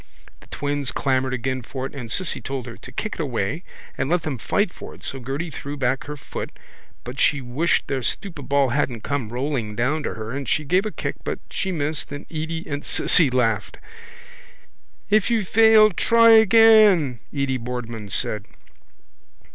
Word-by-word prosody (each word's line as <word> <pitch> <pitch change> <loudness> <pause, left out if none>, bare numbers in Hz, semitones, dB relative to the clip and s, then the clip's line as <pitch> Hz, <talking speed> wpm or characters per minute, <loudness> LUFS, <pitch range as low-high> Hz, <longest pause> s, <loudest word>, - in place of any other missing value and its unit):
The - - -19
twins 145 -2 -2
clamoured 130 -1 0
again 130 +1 -3
for 130 +3 -6
it - - -7
and 125 -5 -5
Cissy 180 -8 +3
told 130 +1 -5
her 115 -2 -8
to 130 - -12
kick 210 +11 -4
it - - -11
away 140 - -2 0.3
and 135 - -2
let 175 0 +1
them 140 -6 -4
fight 195 - 0
for - - -10
it - - -18
so 135 - -4
Gerty 140 +7 -4
drew 145 0 -6
back 130 0 -1
her 150 0 -6
foot 135 - -6 0.5
but 125 +3 -7
she 145 - +3
wished 135 +6 0
their 135 -2 -2
stupid 160 - -4
ball 140 -1 +3
hadn't 125 -4 -1
come 140 -6 -2
rolling 125 -3 -3
down 140 +7 0
to - - -4
her 110 0 -6
and 135 -2 -4
she 150 - +1
gave 185 +8 +1
a - - -5
kick - - -4
but - - -3
she 190 - -2
missed 155 -3 -2
and 145 +1 -7
Edy 160 +1 -4
and 145 -1 -4
Cissy 165 -6 +4
laughed. 115 -4 0 1.3
—If 215 0 +3
you 225 -4 +1
fail 220 +1 +6
try 230 +5 +5
again, 215 - +6
Edy 140 -2 -1
Boardman 120 -3 -6
said. 105 +1 -1
140 Hz, 180 wpm, -22 LUFS, 125-170 Hz, 1.3 s, fail